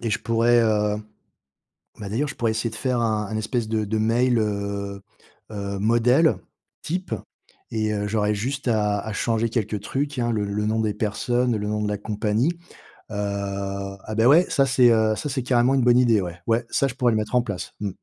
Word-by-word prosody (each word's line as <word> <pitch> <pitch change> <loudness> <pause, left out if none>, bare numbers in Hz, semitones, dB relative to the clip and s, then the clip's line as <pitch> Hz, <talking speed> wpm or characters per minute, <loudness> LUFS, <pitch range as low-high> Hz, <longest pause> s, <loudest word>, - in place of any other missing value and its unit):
et 115 - -1
je - - +1
pourrais, 115 +1 +3
heu, 105 -2 +2 1.0
bah 100 - -6
d'ailleurs, 130 +9 -1
je - - -6
pourrais 115 -2 0
essayer 110 +1 -1
de 110 - -10
faire 125 -2 -1
un 110 -2 0
un 110 +1 -4
espèce 110 +1 -2
de 110 -1 0
de 110 +2 -1
mail, 120 +3 +2
heu, 100 -2 -3 0.5
heu, 100 -1 -4
modèle 120 +9 +3 0.5
type 180 -6 -3 0.6
et 110 -1 -1
heu, 105 0 -2
j'aurais 105 0 +1
juste 130 +5 -3
à 105 -2 +1
à 110 +1 -6
changer 115 +2 0
quelques 110 -3 -2
trucs, 140 +6 -3
hein, 120 -1 0
le 105 -2 0
le 105 +1 -2
nom 110 +1 0
des 110 -1 0
personnes, 120 +3 0
le 105 0 -3
nom 105 0 -1
de 105 - -1
la 105 -1 -2
compagnie, 105 +6 0 0.6
heu, - - -6 0.9
ah 110 - -5
bah 115 +2 +4
ouais, 160 +7 +6
ça, 135 -2 +3
c'est, 125 -2 +5
heu, 110 -1 +3
ça, 150 - -4
c'est 130 -2 -2
carrément 125 +1 +3
une 135 - +2
bonne 120 0 +5
idée, 115 -5 +4
ouais! 90 0 -6
Ouais, 115 +1 +2
ça, 140 -3 +1
je 125 - -5
pourrais 125 -3 +2
le 110 - +1
mettre 110 +3 -2
en 125 - +5
place, 100 -6 -6
mmh. 105 - -1
110 Hz, 215 wpm, -23 LUFS, 105-120 Hz, 1.0 s, ouais